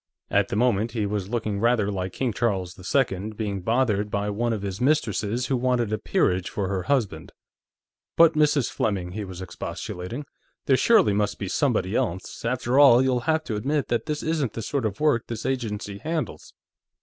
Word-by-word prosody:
At - - +3
the - - -3
moment, 110 -1 +1
he 110 -3 -1
was 100 -2 -3
looking 110 -3 -2
rather 115 -2 +2
like 95 -2 -3
King 125 -4 -1
Charles 95 -6 -1 0.2
II 110 -6 +1
being 100 -3 -3
bothered 110 -1 +1
by 105 0 -1
one 120 +3 -1
of 105 -3 -3
his 100 +1 -4
mistresses 120 -4 +1
who 135 - 0
wanted 120 -3 0
a 110 - -1
peerage 90 -1 +1
for 100 -3 -2
her 95 -2 -1
husband. 130 -3 -1 0.9
"But, 165 -1 +7
Mrs. 150 -4 +2
Fleming," 95 -5 -1
he 105 +3 -4
was 95 -1 -7
expostulating. 95 +7 -6 0.4
"There 135 - +4
surely 200 - +4
must 105 0 0
be 100 - -4
somebody 110 -3 0
else.... 95 -8 -2
After 125 +2 +1
all, 130 -3 +7
you'll 130 -2 +2
have 160 0 +2
to 115 - -4
admit 140 +6 -1
that 120 - -1
this 150 -1 -2
isn't 155 -7 -1
the 115 - -5
sort 135 -2 -1
of 100 - -7
work 150 -7 +2
this 115 -2 -5
agency 105 -6 -3
handles." 160 +3 -4
115 Hz, 185 wpm, -25 LUFS, 100-130 Hz, 0.9 s, But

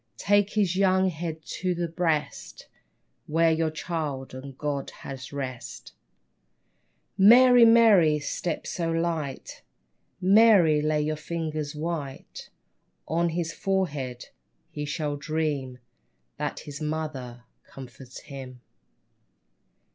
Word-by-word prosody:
Take 205 0 +2
his 195 -4 +1
young 190 -1 +3
head 160 -1 -6
to 180 -1 -1
the 170 0 -2
breast 165 -3 -3 0.6
Where 165 +1 +3
your 160 0 +1
Child 155 -5 -4
and 130 0 -9
God 145 -2 -3
had 135 -1 -9
rest, 130 -4 -7 1.3
Mary, 245 +4 +8
Mary, 215 -9 +6
step 150 +3 -4
so 170 -2 -3
light. 165 -4 -3 0.6
Mary, 190 -5 +5
lay 150 0 +1
your 155 +1 -1
fingers 155 -2 -4
white 150 -3 -6 0.6
On 170 +2 +1
his 170 0 -3
forehead! 150 - -2 0.4
He 150 - -5
shall 150 -1 -3
dream 145 -4 -2 0.6
That - - -4
his 145 +1 -9
mother 150 -6 -5 0.2
comforts 130 -1 -12
him. 130 -4 -10
155 Hz, 105 wpm, -26 LUFS, 145-175 Hz, 1.3 s, Mary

